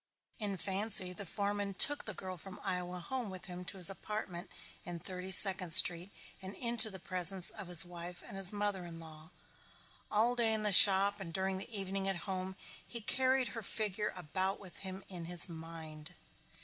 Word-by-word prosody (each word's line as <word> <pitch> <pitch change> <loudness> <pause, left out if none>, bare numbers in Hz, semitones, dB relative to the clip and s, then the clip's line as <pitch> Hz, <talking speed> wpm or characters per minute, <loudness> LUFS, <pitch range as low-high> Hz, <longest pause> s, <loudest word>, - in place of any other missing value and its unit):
In 205 -3 -5
fancy 190 +1 -2
the 195 +1 -9
foreman 200 +1 -4
took 290 +8 +4
the 215 - -6
girl 185 0 -7
from 185 +2 -12
Iowa 180 0 -4
home 240 +5 -6
with 185 -1 -9
him 180 -1 -9
to 195 - -6
his 180 - +4
apartment 195 -2 -4 0.3
in 175 -1 -7
Thirty 185 +2 -8
Second 185 -3 +5
Street 180 +1 +6 0.3
and 190 +1 -9
into 235 -2 +5
the 195 - -10
presence 185 0 -1
of 210 -4 -10
his 175 0 +5
wife 175 0 -10
and - - -11
his 195 -1 +7
mother 205 -3 -3
in 170 -1 -10
law. 160 0 -13 0.8
All 225 +4 0
day 230 -2 +1
in 215 - -5
the 210 - -1
shop 200 +1 +8
and 180 -4 -8
during 190 +2 -3
the 190 - -7
evening 195 -2 -4
at 195 - -1
home 190 -1 -6 0.3
he 235 - -8
carried 260 +3 -1
her 225 - -8
figure 210 -1 -4
about 185 +3 -3
with 185 -5 -13
him 190 0 -8
in 175 -3 -9
his 175 0 -1
mind. 160 -1 -10
190 Hz, 190 wpm, -32 LUFS, 180-205 Hz, 0.8 s, shop